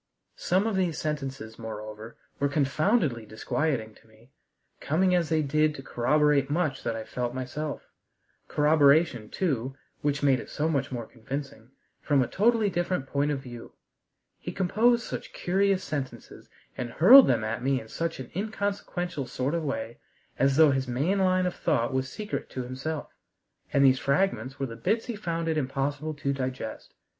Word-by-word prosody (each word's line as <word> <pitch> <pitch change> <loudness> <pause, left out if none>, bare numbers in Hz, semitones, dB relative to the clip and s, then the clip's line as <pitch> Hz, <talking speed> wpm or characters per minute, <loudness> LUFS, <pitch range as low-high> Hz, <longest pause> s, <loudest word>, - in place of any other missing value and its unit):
Some 185 +4 +1
of 225 -3 0
these 180 -4 0
sentences, 135 -7 -4
moreover, 110 0 -8 0.2
were 140 - +1
confoundedly 145 - +1
disquieting 110 +1 -2
to 110 - -23
me, 110 +4 -22 0.5
coming 180 +5 +2
as 175 -3 +2
they 160 -1 +2
did 155 +2 +2
to 135 - -8
corroborate 145 +2 +2
much 155 -1 0
that 115 -1 -2
I 110 - -4
felt 125 +2 -4
myself: 140 +4 -5 0.6
corroboration, 150 -5 +3
too 135 -7 -1 0.3
which 145 0 -1
made 135 -3 +4
it - - -9
so 150 - -1
much 140 -5 -1
more 120 -3 -4
convincing 130 0 -7 0.3
from 140 -3 +3
a - - -3
totally 220 +1 +2
different 175 -5 -1
point 140 +2 0
of 140 -2 -1
view. 120 -3 -10 0.7
He - - -5
composed 230 +6 +2
such - - -6
curious 195 +1 +1
sentences, 140 -6 -6 0.3
and 125 -2 -4
hurled 250 - +9
them 115 -3 +2
at 115 +2 -2
me 135 +1 +1
in 110 - -11
such 165 +6 -3
an 130 - -8
inconsequential 195 - -3
sort 130 +4 -2
of 170 -1 -1
way, 115 -5 -4 0.4
as 135 0 +3
though 155 -2 +7
his 135 -1 -1
main 145 +11 0
line 185 -1 +3
of 180 - -1
thought 125 -2 0
was 130 0 -1
secret 210 +8 -5
to 130 - -4
himself, 135 +5 -5 0.6
and 140 0 +4
these 130 -1 +5
fragments 140 - 0
were 135 - 0
the 115 -3 -7
bits 215 - 0
he 240 - -4
found 170 -5 -3
it 160 -1 +1
impossible 145 +3 -2
to 140 -1 -1
digest. 130 -4 -5
140 Hz, 170 wpm, -27 LUFS, 125-170 Hz, 0.7 s, hurled